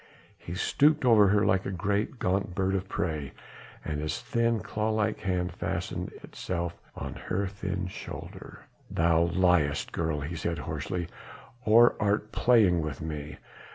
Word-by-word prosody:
He 85 - -7
stooped 145 +8 +3
over 110 -4 +7
her 100 +2 +3
like 95 0 +2
a - - -3
great, 100 +6 -1
gaunt 95 -2 -1
bird 95 0 +1
of 95 0 -2
prey 75 -5 -2 0.5
and 75 -1 -2
his 75 - -2
thin 115 -1 +1
claw 110 +3 -2
like 110 0 0
hand 90 -2 -1
fastened - - -3
itself 85 -1 -4
on - - -5
her 100 +2 -2
thin 95 -1 -3
shoulder. 90 - -9 0.2
"Thou 85 0 +3
liest, 85 -5 +2
girl," 80 -3 -1
he 75 +4 -4
said 85 0 -2
hoarsely, 90 -2 -3 0.6
"or 115 +3 +6
art 105 +1 0
playing 105 -10 +4
with 75 -4 -4
me? 75 -1 -5
95 Hz, 150 wpm, -28 LUFS, 85-105 Hz, 0.6 s, over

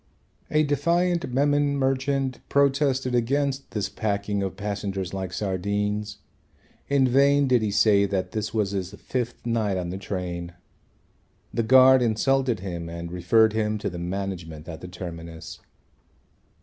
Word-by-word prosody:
A 155 0 +3
defiant 170 +2 +1
Memon 145 +2 +2
merchant 135 -1 0
protested 140 -2 +2
against 135 +3 0
this 105 -2 -2
packing 100 -1 -2
of 95 -1 -3
passengers 100 -3 -3
like 95 -2 -4
sardines. 105 +2 -2 0.7
In 140 -2 +3
vain 140 +2 +4
did 125 -3 +3
he 110 - 0
say 100 0 +4
that 95 -1 -2
this 110 -1 -3
was 105 -3 0
his 95 0 -4
fifth 125 +2 -4
night 110 -5 0
on 90 -1 -3
the 95 - -5
train. 90 -3 -5 1.0
The 115 - +1
guard 130 +2 +7
insulted 120 0 +1
him 85 -3 -5
and 85 0 -6
referred 105 +5 +3
him 110 -1 0
to 105 - -3
the 85 - -6
management 85 -4 -5
at 80 -2 -8
the 90 - -7
terminus. 85 -2 -8
105 Hz, 140 wpm, -25 LUFS, 95-130 Hz, 1.0 s, guard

